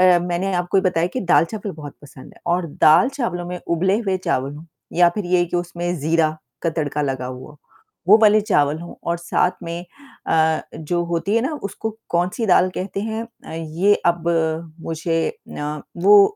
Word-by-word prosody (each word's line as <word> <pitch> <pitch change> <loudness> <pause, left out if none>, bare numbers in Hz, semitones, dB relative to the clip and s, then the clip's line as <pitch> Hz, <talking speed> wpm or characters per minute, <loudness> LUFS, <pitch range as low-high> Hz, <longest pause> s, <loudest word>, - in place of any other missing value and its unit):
अ, - - +3
मैंने 180 +2 -1
आपको 180 +2 +1
ये - - +4
बताया 175 -2 +2
कि - - +1
दाल-चावल 195 +3 +1
बहुत 145 -3 -9
पसंद 135 -2 -13
है - - -21
और 175 -2 -3
दाल-चावलों 180 - +4
में 180 0 -5
उबले 185 +4 +2
हुए 190 -4 0
चावल 135 +2 0
हो 155 +3 -11 0.3
या 175 0 +5
फ़िर 190 +2 -4
ये 175 0 +3
कि 175 +1 -2
उसमें 175 0 -3
ज़ीरा 155 +1 +1 0.2
का 165 - +1
तड़का 150 -2 -2
लगा 130 -3 -2
हुआ 130 +2 -7
हो। 150 - -20 0.5
वो 210 +3 +9
वाले 215 0 +6
चावल 155 -7 +2
हो 170 - -10
और 170 0 -1
साथ 175 +1 +1
में 170 +1 -5 0.4
अ, 160 0 +3
जो 170 +2 -1
होती 170 +5 -1
है 230 - +3
ना 270 - -1
उसको 205 +2 -4 0.2
कौन-सी 180 +6 0
दाल 185 -1 +4
कहते 195 +1 -3
हैं 220 +1 -3 0.2
अ, - - -8
ये 165 +5 +1
अब 170 -1 +2 0.6
मुझे 165 0 -1
अ, 150 0 -6 0.2
वो 200 - +6
175 Hz, 185 wpm, -21 LUFS, 160-190 Hz, 0.6 s, वो